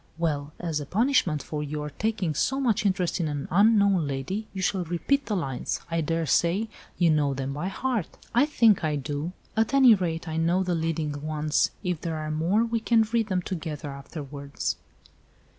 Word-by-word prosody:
Well, 150 Hz, -3 st, -1 dB
as 165 Hz, -4 st, -2 dB
a 145 Hz, -, -6 dB
punishment 205 Hz, -, +2 dB
for 150 Hz, -1 st, -4 dB
your 150 Hz, 0 st, -4 dB
taking 205 Hz, -2 st, -1 dB
so 265 Hz, -, 0 dB
much 225 Hz, -6 st, +2 dB
interest 185 Hz, -2 st, 0 dB
in 165 Hz, -, 0 dB
an 145 Hz, -2 st, -3 dB
unknown 200 Hz, -3 st, +4 dB
lady 180 Hz, +11 st, -3 dB
you 190 Hz, -, -6 dB
shall 190 Hz, 0 st, 0 dB
repeat 180 Hz, -, 0 dB
the 210 Hz, -, 0 dB
lines. 135 Hz, -9 st, -2 dB
I 165 Hz, 0 st, +1 dB
daresay 170 Hz, -, +1 dB, 0.3 s
you 170 Hz, -2 st, +4 dB
know 145 Hz, -3 st, +2 dB
them 135 Hz, +1 st, -3 dB
by 150 Hz, +6 st, -3 dB
heart." 220 Hz, -1 st, -1 dB, 0.3 s
"I 245 Hz, +5 st, +4 dB
think 230 Hz, -, +4 dB
I 155 Hz, -1 st, +1 dB
do. 145 Hz, +3 st, -3 dB, 0.2 s
At 225 Hz, +4 st, +2 dB
any 260 Hz, -4 st, +8 dB
rate 170 Hz, -4 st, -1 dB
I 160 Hz, 0 st, -3 dB
know 170 Hz, +3 st, +2 dB
the 180 Hz, -1 st, -1 dB
leading 160 Hz, -3 st, -2 dB
ones. 155 Hz, 0 st, +1 dB
If 180 Hz, -4 st, -2 dB
there 165 Hz, -2 st, -3 dB
are 155 Hz, 0 st, -3 dB
more 175 Hz, +9 st, +2 dB
we 230 Hz, 0 st, -1 dB
can 225 Hz, 0 st, +3 dB
read 225 Hz, 0 st, 0 dB
them 185 Hz, -3 st, 0 dB
together 160 Hz, -5 st, -5 dB
afterwards. 140 Hz, 0 st, -5 dB
170 Hz, 185 wpm, -26 LUFS, 150-210 Hz, 0.3 s, any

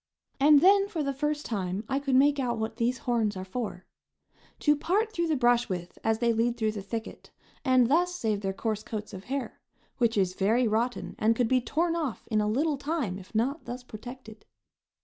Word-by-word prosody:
And 290 Hz, +1 st, +7 dB
then 395 Hz, +2 st, +5 dB
for 335 Hz, -7 st, -3 dB
the 275 Hz, -1 st, -1 dB
first 295 Hz, +2 st, -2 dB
time 195 Hz, -2 st, -2 dB
I 270 Hz, +1 st, 0 dB
could 275 Hz, -2 st, 0 dB
make 285 Hz, +2 st, +4 dB
out 240 Hz, -3 st, -1 dB
what 220 Hz, 0 st, -3 dB
these 240 Hz, +2 st, +1 dB
horns 230 Hz, -4 st, 0 dB
are 185 Hz, -, -5 dB
for 190 Hz, -3 st, -5 dB, 0.8 s
to 295 Hz, -1 st, +4 dB
part 415 Hz, +9 st, 0 dB
the 335 Hz, -4 st, 0 dB
brush 240 Hz, -2 st, +3 dB
with 175 Hz, -2 st, -5 dB
as 225 Hz, 0 st, +2 dB
they 235 Hz, 0 st, +2 dB
lead 235 Hz, +2 st, +1 dB
through 220 Hz, -1 st, +1 dB
the 210 Hz, -2 st, -6 dB
thicket, 225 Hz, +3 st, -6 dB, 0.3 s
and 255 Hz, -3 st, +4 dB
thus 355 Hz, +6 st, +2 dB
save 215 Hz, -, -1 dB
their 195 Hz, -1 st, -1 dB
coarse 215 Hz, +2 st, -2 dB
coats 215 Hz, -2 st, -6 dB
of 190 Hz, 0 st, -8 dB
hair, 270 Hz, -1 st, -4 dB, 0.4 s
which 235 Hz, -3 st, +2 dB
is 185 Hz, -2 st, +2 dB
very 225 Hz, +6 st, +2 dB
rotten, 230 Hz, +3 st, -1 dB
and 225 Hz, +1 st, +3 dB
could 245 Hz, 0 st, +1 dB
be 255 Hz, +1 st, +3 dB
torn 330 Hz, +8 st, 0 dB
off 295 Hz, -, -3 dB
in 215 Hz, -1 st, +3 dB
a 210 Hz, -, 0 dB
little 290 Hz, +6 st, +1 dB
time 275 Hz, -, -2 dB
if 190 Hz, +4 st, -15 dB
not 270 Hz, +8 st, 0 dB
thus 245 Hz, +1 st, -6 dB
protected. 230 Hz, -1 st, -10 dB
240 Hz, 205 wpm, -28 LUFS, 215-280 Hz, 0.8 s, And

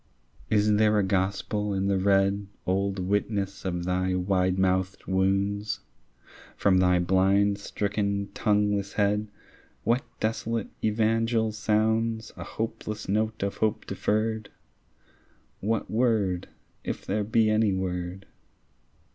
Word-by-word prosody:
Is 105 Hz, 0 st, +3 dB
there 105 Hz, 0 st, +4 dB
a 105 Hz, -, +3 dB
gospel 100 Hz, +2 st, -1 dB
in 95 Hz, 0 st, 0 dB
the 100 Hz, -1 st, +2 dB
red 100 Hz, +1 st, +2 dB, 0.2 s
Old 95 Hz, +1 st, 0 dB
witness 100 Hz, +1 st, -1 dB
of 90 Hz, -2 st, -2 dB
thy 90 Hz, +1 st, 0 dB
wide 90 Hz, 0 st, +1 dB
mouthed 95 Hz, 0 st, 0 dB
wounds? 100 Hz, +2 st, 0 dB, 0.8 s
From 95 Hz, -2 st, +3 dB
thy 90 Hz, -1 st, +4 dB
blind 95 Hz, +3 st, +3 dB
stricken 100 Hz, -1 st, -2 dB
tongueless 105 Hz, -1 st, +1 dB
head 105 Hz, +1 st, +1 dB, 0.6 s
What 120 Hz, +4 st, +2 dB, 0.2 s
desolate 115 Hz, 0 st, -1 dB
evangel 110 Hz, +1 st, +2 dB
sounds 110 Hz, +1 st, 0 dB
A -, -, -7 dB
hopeless 110 Hz, -1 st, -5 dB
note 110 Hz, +1 st, 0 dB
of 100 Hz, -, -2 dB
hope 110 Hz, -1 st, 0 dB
deferred? 110 Hz, 0 st, -1 dB, 1.1 s
What 110 Hz, +2 st, -1 dB
word, 110 Hz, -6 st, +1 dB, 0.3 s
if -, -, -4 dB
there 105 Hz, +2 st, 0 dB
be 110 Hz, +1 st, +3 dB
any 110 Hz, -1 st, +3 dB
word? 95 Hz, 0 st, -3 dB
100 Hz, 115 wpm, -27 LUFS, 95-110 Hz, 1.1 s, there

